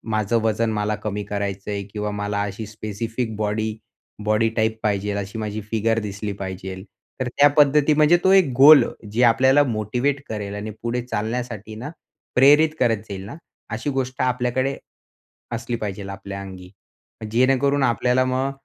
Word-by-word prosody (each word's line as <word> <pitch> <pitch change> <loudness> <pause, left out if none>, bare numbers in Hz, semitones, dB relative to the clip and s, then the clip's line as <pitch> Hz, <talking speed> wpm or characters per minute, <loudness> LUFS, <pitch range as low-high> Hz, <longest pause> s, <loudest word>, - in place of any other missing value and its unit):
माझं 110 +2 +1
वजन 110 +1 +1
मला 105 0 -1
कमी 105 -1 -4
करायचं 100 0 -4
आहे 100 -1 -3
किंवा 105 0 -3
मला 105 0 -2
अशी 105 +2 -4
स्पेसिफिक 110 +2 -4
बॉडी, 110 +1 -1 0.5
बॉडी 110 +1 +2
टाइप 110 0 +1
पाहिजेल 100 -1 0
अशी 100 +2 -5
माझी 110 0 -4
फिगर 115 0 +1
दिसली 105 -1 -5
पाहिजेल. 95 0 -6 0.4
तर 130 - -1
त्या 140 +4 +5
पद्धती 150 +1 +5
म्हणजे 155 +3 +5
तो 190 - +4
एक 190 -8 +5
गोल 140 0 +9 0.3
जे 120 +4 +1
आपल्याला 130 +4 +5
मोटिवेट 125 +4 -1
करेल 105 -2 -4
आणि 105 +1 -5
पुढे 120 +1 -2
चालण्यासाठी 115 -2 -4
ना, 120 +7 -6 0.5
प्रेरित 145 +5 +6
करत 115 -3 +3
जाईल 95 -1 -6
ना, 115 - -8 0.3
अशी - - -3
गोष्ट 130 -1 -2
आपल्याकडे 125 +1 0 0.7
असली 120 +1 -3
पाहिजेल, 100 -2 -5
आपल्या 100 0 -7
अंगी, 95 -2 -10 0.6
जेणेकरून 135 +4 +2
आपल्याला 125 +1 +2
मग 130 +1 0
110 Hz, 155 wpm, -22 LUFS, 105-130 Hz, 0.7 s, गोल